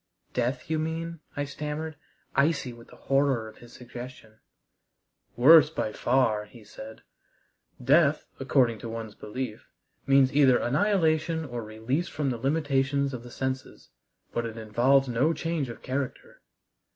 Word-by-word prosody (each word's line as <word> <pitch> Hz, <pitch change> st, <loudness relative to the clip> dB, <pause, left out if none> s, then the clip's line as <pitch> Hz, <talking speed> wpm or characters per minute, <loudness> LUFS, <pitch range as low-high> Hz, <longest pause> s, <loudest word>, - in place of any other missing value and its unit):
"Death 125 Hz, +1 st, -1 dB
you 160 Hz, 0 st, 0 dB
mean?" 165 Hz, +1 st, -3 dB, 0.2 s
I 145 Hz, -, 0 dB
stammered, 150 Hz, +2 st, -5 dB, 0.4 s
icy 140 Hz, -3 st, +1 dB
with 115 Hz, 0 st, -14 dB
the -, -, -15 dB
horror 135 Hz, -5 st, +1 dB
of 110 Hz, -, -13 dB
his 120 Hz, 0 st, -14 dB
suggestion. 120 Hz, -3 st, -10 dB, 1.0 s
"Worse 155 Hz, +5 st, +8 dB
by 110 Hz, -9 st, -3 dB
far," 115 Hz, -4 st, +1 dB
he 110 Hz, +1 st, -15 dB
said. 110 Hz, +1 st, -11 dB, 0.8 s
"Death, 145 Hz, +3 st, +3 dB
according 130 Hz, -4 st, +2 dB
to 115 Hz, -, -7 dB
one's 115 Hz, -2 st, -6 dB
belief, 110 Hz, +1 st, -6 dB, 0.4 s
means 135 Hz, -1 st, +5 dB
either 135 Hz, -3 st, +5 dB
annihilation 160 Hz, 0 st, +1 dB
or 120 Hz, -4 st, -5 dB
release 110 Hz, +10 st, -2 dB
from 145 Hz, -5 st, -2 dB
the 120 Hz, -, -4 dB
limitations 140 Hz, 0 st, +1 dB
of 125 Hz, -, -5 dB
the 120 Hz, -, -11 dB
senses, 130 Hz, +1 st, -5 dB, 0.4 s
but 120 Hz, -, -1 dB
it 115 Hz, 0 st, -8 dB
involves 120 Hz, +5 st, +3 dB
no 125 Hz, +7 st, +2 dB
change 165 Hz, -4 st, -2 dB
of 115 Hz, -, -9 dB
character. 130 Hz, 0 st, -4 dB
135 Hz, 140 wpm, -27 LUFS, 120-150 Hz, 1.0 s, Worse